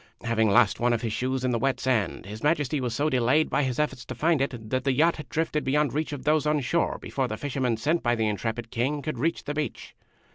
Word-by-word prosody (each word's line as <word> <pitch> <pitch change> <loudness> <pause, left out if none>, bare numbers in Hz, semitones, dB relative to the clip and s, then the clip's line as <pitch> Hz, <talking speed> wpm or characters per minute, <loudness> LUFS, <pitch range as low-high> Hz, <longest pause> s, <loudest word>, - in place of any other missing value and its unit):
Having 115 -2 +2
lost 115 +1 +4
one 120 0 +2
of 115 - -1
his 115 -2 -1
shoes 130 +2 -1
in 130 - +1
the 115 - 0
wet 135 +3 0
sand, 120 -9 0
His 105 +3 -8
Majesty 150 -2 +1
was 120 -2 -2
so 145 +4 +1
delayed 130 +3 +2
by - - +2
his 130 -3 -1
efforts 150 -5 -1
to 125 - -6
find 155 +3 +2
it 120 -5 -3
that 130 -1 0
the 135 -1 +2
yacht 165 +6 +3
had 150 - -9
drifted 155 -1 -1
beyond 145 +2 +1
reach 155 +2 -1
of 145 -3 -6
those 150 0 +2
on 150 0 +2
shore 165 +6 0
before 135 -2 -2
the 110 - -4
fishermen 130 -2 -1
sent 155 +9 +1
by 120 -1 +1
the 110 -1 0
intrepid 110 +3 -3
King 135 +5 -1
could 155 -6 -4
reach 165 +6 0
the 145 - -4
beach. 150 0 -4
130 Hz, 255 wpm, -26 LUFS, 120-150 Hz, -, lost